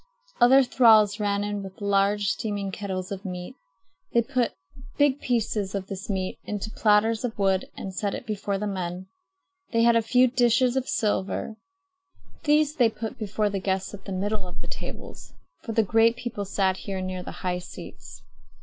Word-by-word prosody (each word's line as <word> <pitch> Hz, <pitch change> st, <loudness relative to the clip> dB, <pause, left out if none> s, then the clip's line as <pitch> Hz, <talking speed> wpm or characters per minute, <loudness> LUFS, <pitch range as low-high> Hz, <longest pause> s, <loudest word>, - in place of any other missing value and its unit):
Other 265 Hz, +3 st, +7 dB
thralls 220 Hz, -4 st, +5 dB
ran 205 Hz, -1 st, 0 dB
in 205 Hz, 0 st, -3 dB
with 190 Hz, -1 st, -10 dB
large 200 Hz, 0 st, +2 dB
steaming 200 Hz, -1 st, -2 dB
kettles 185 Hz, -1 st, -4 dB
of 195 Hz, -1 st, -5 dB
meat. 180 Hz, +5 st, -6 dB, 0.6 s
They 235 Hz, -, +4 dB
put 250 Hz, -1 st, -1 dB, 0.4 s
big 285 Hz, -1 st, +3 dB
pieces 215 Hz, -5 st, -1 dB
of 195 Hz, -1 st, -3 dB
this 195 Hz, +2 st, -7 dB
meat 190 Hz, -2 st, -2 dB
into 210 Hz, +1 st, -4 dB
platters 215 Hz, +2 st, +3 dB
of 235 Hz, -2 st, -3 dB
wood 195 Hz, -2 st, +2 dB
and 190 Hz, -, -6 dB
set 200 Hz, +1 st, -2 dB
it -, -, -7 dB
before 200 Hz, -2 st, -2 dB
the 210 Hz, -, -3 dB
men. 185 Hz, -2 st, -4 dB, 0.6 s
They 230 Hz, -2 st, +3 dB
had 235 Hz, 0 st, +5 dB
a 230 Hz, -, +4 dB
few 250 Hz, +3 st, +4 dB
dishes 245 Hz, 0 st, +3 dB
of 265 Hz, -1 st, -1 dB
silver. 210 Hz, 0 st, -1 dB, 0.9 s
These 300 Hz, 0 st, +3 dB
they 240 Hz, -4 st, +5 dB
put 225 Hz, 0 st, -6 dB
before 210 Hz, -1 st, -1 dB
the 200 Hz, -, -1 dB
guests 190 Hz, 0 st, -2 dB
at 195 Hz, -1 st, -10 dB
the 195 Hz, -, -6 dB
middle 200 Hz, +1 st, -2 dB
of 180 Hz, -, -8 dB
the -, -, -6 dB
tables; -, -, -8 dB, 0.3 s
for 225 Hz, -, -5 dB
the 225 Hz, -, +3 dB
great 225 Hz, +3 st, +4 dB
people 240 Hz, -4 st, -5 dB
sat 190 Hz, -1 st, +1 dB
here 195 Hz, -1 st, -5 dB
near 185 Hz, 0 st, -4 dB
the -, -, -7 dB, 0.2 s
high 180 Hz, 0 st, 0 dB
seats. 180 Hz, -, -11 dB
205 Hz, 180 wpm, -26 LUFS, 195-230 Hz, 0.9 s, Other